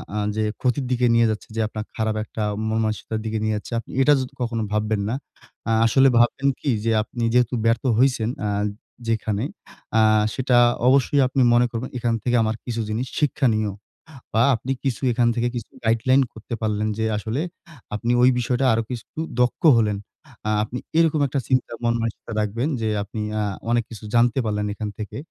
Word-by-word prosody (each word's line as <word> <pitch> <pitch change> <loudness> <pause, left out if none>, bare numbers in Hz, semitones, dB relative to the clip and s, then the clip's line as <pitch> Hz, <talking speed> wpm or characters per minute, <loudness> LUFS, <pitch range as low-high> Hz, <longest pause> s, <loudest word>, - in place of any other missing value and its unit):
আ - - -1 0.2
যে 110 - 0 0.2
ক্ষতির 130 +1 +1
দিকে 125 0 +2
নিয়ে 115 0 +5
যাচ্ছে 110 -1 -4
যে 115 - 0
আপনার 110 0 -6
খারাপ 110 -1 -1
একটা 110 0 -5 0.3
মনমানসিকতার 110 0 -1
দিকে 110 0 -2
নিয়ে 110 0 +1
যাচ্ছে। 105 - -7
আপনি 115 - -11
এটা 145 +2 +6
যত 130 -1 -4
কখনো 115 -2 -1
ভাববেন 105 0 0
না। 120 - -1 0.5
আ - - +2
আসলে 135 +4 +5
ভাববেন 120 +4 +3
কি 145 - -2
যে 115 - +1
আপনি 115 +2 -5
যেহেতু 125 -1 +3
ব্যর্থ 115 0 +2
হইছেন, 125 -3 +2 0.2
আ - - 0 0.6
যেখানে 110 -2 -1 0.6
আ - - +6 0.3
সেটা 130 -2 +2 0.3
অবশ্যই 140 +2 +4
আপনি 130 +1 0
মনে 120 +1 +5
করবেন। 120 +2 -4
এখান 120 -1 0
থেকে 125 0 +1
আমার 110 0 0
কিছু 115 -2 -2
জিনিস 115 +4 -2
শিক্ষনীয়। 120 -8 +1 0.6
বা 115 - +3
আপনি 125 +3 -2
কিছু 130 -3 -1
এখান 120 0 +2
থেকে 120 0 0
কিছু 115 - -6
গাইডলাইন 115 +4 +3
করতে 110 +2 -7
পারলেন 110 -1 0
যে 110 - 0
আসলে 110 +6 -2 0.5
আপনি 115 +3 0
ওই 125 - +7
বিষয়টা 125 +2 0
আরো 115 +1 +1
কিছু 120 -3 -5 0.3
দক্ষ 125 -1 +1 0.2
হলেন। 105 -2 +1 0.5
আ - - +2
আপনি 120 +3 -6 0.2
এরকম 160 -2 +3
একটা 140 +1 -1
চিন্তা, 130 -2 +1
মন 115 0 +2
মানসিকতা 115 0 -4
রাখবেন 110 +6 -1
যে 110 - 0
আপনি 110 +2 -6 0.2
আ - - +1 0.3
অনেক 120 -1 +2
কিছু 110 -1 -10
জানতে 120 +2 +3
পারলেন 105 -1 -1
এখান 105 0 -4
থেকে। 105 - -6
115 Hz, 185 wpm, -23 LUFS, 110-125 Hz, 0.6 s, ওই